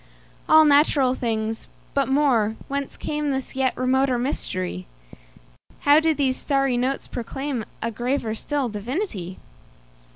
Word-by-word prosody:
All 315 0 +8
natural 285 -3 +4
things! 225 -3 -2 0.3
But 275 -1 +1
more—Whence 270 0 0
cameThis 285 -3 -3
yet 265 -1 0
remoter 255 0 +2
mystery? 90 - -3 0.9
How 290 +1 +6
do 320 -1 +2
these 265 -3 +1
starry 275 -3 +1
notes 255 +3 -1
proclaimA 255 0 -4 0.3
graver 240 0 -1
still 280 +4 -2
divinity? 210 - -4
265 Hz, 105 wpm, -23 LUFS, 230-285 Hz, 0.9 s, All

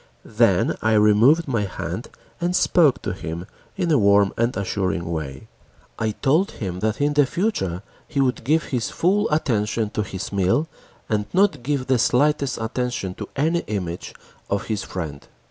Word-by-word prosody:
Then - - +2
I 110 0 +2
removed 110 +10 +5
my 115 -6 0
hand 95 - -5 0.3
and 175 +1 0
spoke 160 -8 +3
to - - -2
him 85 -1 -6 0.3
in 170 - 0
a 150 - +4
warm 100 -1 +4
and 115 -2 0
assuring 95 -2 -1
way. 70 -5 -5 0.5
I 110 - 0
told 155 +8 +2
him 90 -4 -5
that 110 +2 -1
in 145 +1 +2
future 145 - 0 0.2
he 145 - -3
would 130 -3 +1
give 155 +6 +2
his 120 -4 -2
full 200 +5 +1
attention 110 -7 0
to - - -1
his 95 -2 -5
meal, 100 - +1 0.4
and 105 -2 -1
not 185 -7 +3
give 135 0 -1
the 130 -2 +2
slightest 140 +2 +2
attention 110 -4 -3
to 105 +2 -8
any 160 +5 +1
image 90 -5 -4 0.3
of 100 - -1
his 110 -3 -2
friend. 80 -6 -6
115 Hz, 165 wpm, -22 LUFS, 100-145 Hz, 0.5 s, removed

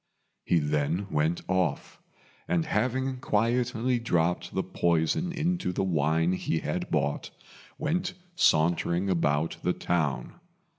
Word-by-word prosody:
He 85 - +2
then 75 +4 0
went 80 +3 +1
off; 95 -1 -1 0.5
and 85 -2 +1
having 130 +4 0
quietly 120 +1 +1
dropped 90 -6 0
the - - +1
poison 85 - +1
into 175 - -1
the 90 - -1
wine 80 -1 +2
he 85 -3 -1
had - - -3
bought, 70 - -1 0.5
went 175 +4 -1 0.2
sauntering 85 - +2
about 80 -2 +1
the 90 - +1
town. 85 - -1
90 Hz, 115 wpm, -28 LUFS, 80-125 Hz, 0.5 s, He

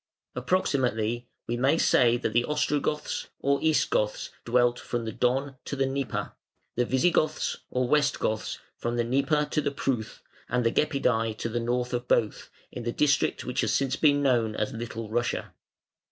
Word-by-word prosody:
Approximately 120 - 0 0.2
we 120 - -2
may 135 +6 +3
say 120 -6 +4
that 115 -3 -2
the 120 +1 +3
Ostrogoths 150 0 -1
(or 140 0 +1
East 160 -1 +2
Goths) 105 0 0
dwelt 120 0 +3
from 120 -1 -3
the 110 - -3
Don 130 +4 0
to - - -4
the 135 -1 +1
Dnieper, 135 0 -2 0.4
the 125 - +2
Visigoths 155 +4 +1
(or 125 0 0
West 150 +1 +2
Goths) 110 0 -2 0.2
from 120 0 -3
the 120 - +1
Dnieper 140 +5 +1
to 155 - +1
the - - 0
Pruth, 130 -5 -3 0.3
and 125 0 0
the 115 - +3
Gepidæ 115 -7 +1
to 115 - -3
the 120 +1 -1
north 125 +1 -1
of 120 0 -2
both, 110 -4 +1 0.2
in 125 - -6
the 120 0 -2
district 140 +2 +1
which 125 - -1
has - - 0
since 135 -1 +1
been 145 -1 +3
known 115 -5 +2
as 105 - -2
Little 115 -1 -5
Russia. 120 +2 -2
125 Hz, 175 wpm, -27 LUFS, 120-140 Hz, 0.4 s, say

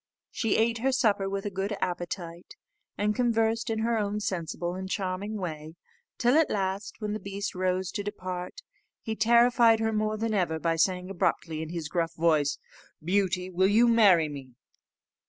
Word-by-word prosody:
She 225 -3 0
ate 230 +1 +1
her 265 +3 +1
supper 205 -6 +1
with 195 +1 -4
a 205 - -2
good 195 +2 -3
appetite, 175 - -5 0.4
and 210 +1 +1
conversed 225 -2 +1
in 220 -1 -1
her 230 0 +1
own 205 0 -1
sensible 175 -3 -3
and 190 +1 -6
charming 195 +2 -3
way, 160 -4 -6 0.4
till 245 0 +3
at 320 - +3
last, 195 0 -2
when 210 -1 -3
the 215 - -3
beast 200 +1 -5
rose 185 0 -1
to 205 - -4
depart, 185 - -6 0.4
he 220 -2 -3
terrified 235 0 +5
her 225 0 0
more 215 0 0
than 225 0 -1
ever 175 -5 0
by 165 +1 0
saying 180 +2 0
abruptly, 165 -3 -1
in 160 - -5
his 165 -2 -4
gruff 165 0 -2
voice, 155 -3 +2 0.5
"Beauty, 185 0 0
will 185 +1 +3
you 225 +4 +4
marry 200 -9 +5
me!" 135 -4 -9
195 Hz, 175 wpm, -28 LUFS, 175-220 Hz, 0.5 s, terrified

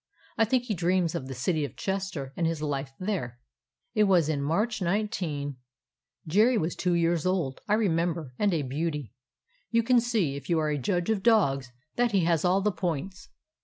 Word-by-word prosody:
I 225 - +3
think 245 +2 +1
he 240 -3 -2
dreams 175 -1 +1
of 145 -7 -4
the 135 - -6
City 155 +5 0
of 140 - -5
Chester 190 -9 -3
and 170 - +1
his 165 -1 -2
life 140 -2 -3
there. 185 - -3 0.6
"It 215 -2 +4
was 175 -6 +3
in 145 -3 0
March, 205 +10 0
19 170 - -2 0.3
—; - - -55
Jerry 220 +9 +4
was 165 -2 -1
two 180 -2 0
years 170 -1 +2
old, 170 -8 -1
I 210 - +3
remember, 165 - 0
and 205 -1 +3
a 160 -4 0
beauty. 145 -2 -3 0.6
You 230 0 +2
can 245 +1 +4
see, 220 - 0
if 140 -1 -8
you 170 - +3
are 155 -1 +1
a 150 -1 -1
judge 175 - 0
of 210 -3 0
dogs, 140 - +3 0.3
that 240 -2 +2
he 195 - +4
has 165 -2 +2
all 185 +2 +3
the 210 +2 +2
points. 180 0 -4
170 Hz, 200 wpm, -28 LUFS, 150-200 Hz, 0.6 s, It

